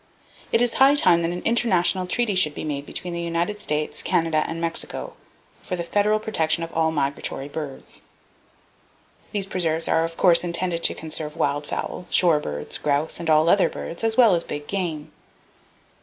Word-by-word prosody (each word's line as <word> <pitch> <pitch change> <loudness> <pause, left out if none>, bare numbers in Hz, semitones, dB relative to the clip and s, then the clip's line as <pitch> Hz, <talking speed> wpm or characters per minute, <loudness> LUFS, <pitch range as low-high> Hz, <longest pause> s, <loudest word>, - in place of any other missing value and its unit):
It 230 - +3
is 245 - +2
high 275 +2 +7
time 175 -11 +4
that 165 - 0
an 175 +1 -5
international 190 -5 +2
treaty 235 +2 0
should 155 -6 +3
be - - -5
made 145 -2 -4
between 175 -1 -5
the 170 - -3
United 170 +5 -2
States, 150 -3 -1
Canada 165 -4 +1
and 165 0 -5
Mexico 165 0 -3 0.5
for 180 - -4
the 170 - -3
federal 210 +4 +1
protection 165 -7 0
of 165 - -7
all 160 0 +2
migratory 140 -2 -2
birds. 145 -2 -7 1.3
These 200 -2 -1
preserves 165 -4 0
are 160 - +2
of 165 0 -5
course 175 -2 +5
intended 170 0 -1
to - - +1
conserve 155 0 -6
wild 145 -2 -1
fowl, 180 - -5
shore 170 -4 +3
birds, 75 - -5
grouse 145 +2 0
and 170 -1 -3
all 155 +1 +4
other 190 +3 +4
birds, 170 - -7
as 225 0 +1
well 235 -6 +6
as 170 -1 +1
big 145 0 -6
game. 170 -6 -4
170 Hz, 180 wpm, -23 LUFS, 155-185 Hz, 1.3 s, high